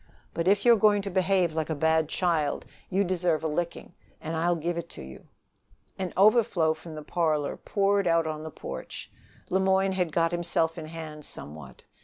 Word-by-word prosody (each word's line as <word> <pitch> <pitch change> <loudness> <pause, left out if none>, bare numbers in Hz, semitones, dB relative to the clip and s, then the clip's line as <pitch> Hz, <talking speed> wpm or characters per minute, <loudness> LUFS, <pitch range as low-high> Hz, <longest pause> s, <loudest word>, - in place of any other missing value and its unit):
But 165 +1 -2
if 200 +4 +3
you 240 - +8
are - - +3
going 205 -1 +4
to 200 - -4
behave 185 -2 +2
like 160 0 -2
a 160 - -1
bad 160 +1 +2
child, 165 -5 0 0.2
you 195 +2 +2
deserve 175 -4 0
a - - +1
licking, 170 +3 -4 0.3
and 160 +1 -4
I'll 170 +2 +1
give 170 +2 -2
it 170 0 -5
to - - -7
you." 65 0 -12 0.7
An 185 -2 -2
overflow 200 -6 +4
from 160 0 -11
the 155 - -7
parlor 155 -4 0
poured 200 -1 +1
out 165 -1 +3
on 155 -1 -4
the 160 - -6
porch. - - -8 0.4
Le 190 - +3
Moyne 190 0 +2
had 180 -3 0
got 165 +1 +1
himself 170 -1 0
in 155 - -7
hand 155 -2 -8
somewhat. 75 - -10
170 Hz, 195 wpm, -27 LUFS, 155-190 Hz, 0.7 s, you